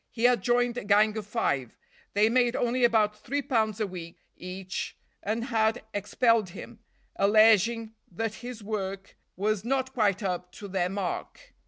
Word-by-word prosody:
He 230 - -6
had 245 0 +5
joined 245 0 +1
a - - -8
gang 210 +2 +4
of 215 -2 -5
five; 140 - -1 0.4
they 210 +1 +5
made 245 +1 +2
only 245 +1 0
about 220 -3 +3
three 280 +6 -2
pounds 220 -4 0
a 215 - +1
week 175 -3 -8 0.2
each, 185 +1 -6 0.2
and 220 +3 -2
had 225 -1 +1
expelled 215 +1 +2
him, 225 +5 -10 0.4
alleging 220 +2 +4 0.2
that 225 +4 -2
his 245 -3 -7
work 195 -2 -4 0.2
was 210 +1 0
not 260 +2 -1
quite 210 -4 +1
up 180 -1 -3
to 205 - -9
their 185 -2 0
mark. 200 - -5
215 Hz, 160 wpm, -28 LUFS, 195-235 Hz, 0.4 s, had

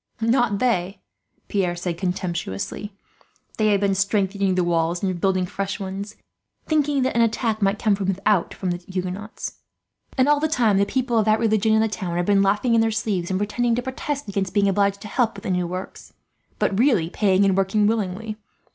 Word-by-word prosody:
"Not 230 -2 +2
they," 195 -5 0 0.5
Pierre 185 -4 0
said 175 -1 -4
contemptuously. 180 - -3 0.7
"They 215 - +3
have 205 -2 +3
been 200 -1 +2
strengthening 195 -1 +1
the 180 - +2
walls 170 +1 0
and 185 -3 -1
building 185 -1 +2
fresh 195 +3 -4
ones, 195 +2 -5 0.5
thinking 295 -3 +1
that 260 - -1
an 235 - +4
attack 225 -1 0
might 200 +1 +2
come 215 -1 +2
from 195 -1 -2
without 195 0 +1
from 185 -2 -3
the 175 - -2
Huguenots; 185 +3 -6 0.6
and 260 +1 +4
all 295 0 +4
the 315 - +1
time 230 -10 +2
the 200 - +2
people 250 -2 0
of 215 - +2
that 215 0 +4
religion 220 -1 +2
in 220 - +4
the 225 - +2
town 185 -5 -4
have 175 - 0
been 200 0 +4
laughing 205 +5 +2
in 230 - +5
their 225 - +2
sleeves, 205 -5 -2
and 190 0 0
pretending 230 +3 0
to 245 - -2
protest 270 +1 -4
against 195 -1 -3
being 200 -1 +4
obliged 200 0 +1
to - - -7
help 225 -2 0
at 200 - -10
the - - -2
new 180 -1 0
works, 185 +2 -7 0.4
but 195 - 0
really 220 - +3
paying 195 -1 +3
and 195 -1 +3
working 195 +2 +2
willingly. 215 0 -1
200 Hz, 200 wpm, -23 LUFS, 185-225 Hz, 0.7 s, in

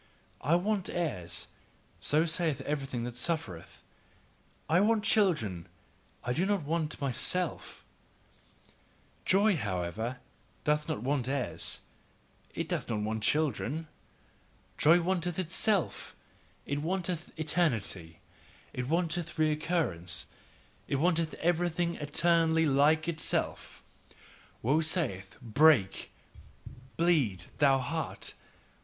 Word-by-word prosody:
"I 155 +5 +4
want 195 +2 0
heirs," 90 - -2 0.5
so 155 +3 +2
saith 160 -4 0
everything 135 -4 -3
that 120 0 -5
suffereth, 120 - -3 0.8
"I 165 +3 +4
want 215 +1 +3
children, 150 - +1 0.6
I 125 - -1
do 165 - +1
not 200 -5 +1
want 155 0 -2
MYSELF," 150 +6 -1 1.4
Joy, 200 0 +4
however, 105 - -2 0.5
doth 150 0 +1
not 105 - -2
want 135 -1 0
heirs, 135 -3 -2 0.7
it - - -2
doth - - -3
not 105 -2 -1
want 110 +1 -2
children, 155 +3 0 0.9
joy 165 +4 +6
wanteth 175 -1 -1
itself, 190 +2 0 0.5
it 145 +1 -2
wanteth 175 0 -2
eternity, 115 - -1 0.5
it 125 0 -3
wanteth 170 +1 -1
recurrence, 155 - 0 0.6
it - - 0
wanteth 165 +2 +1
everything 175 0 +1
eternally 160 +2 +3
like 150 +3 +4
itself. 165 -1 -2 0.8
Woe 145 +7 +3
saith: 145 - -1
"Break, 120 -3 +4 0.9
bleed, 140 - +2
thou 140 -2 +5
heart! 160 +5 -3
155 Hz, 100 wpm, -31 LUFS, 125-170 Hz, 1.4 s, joy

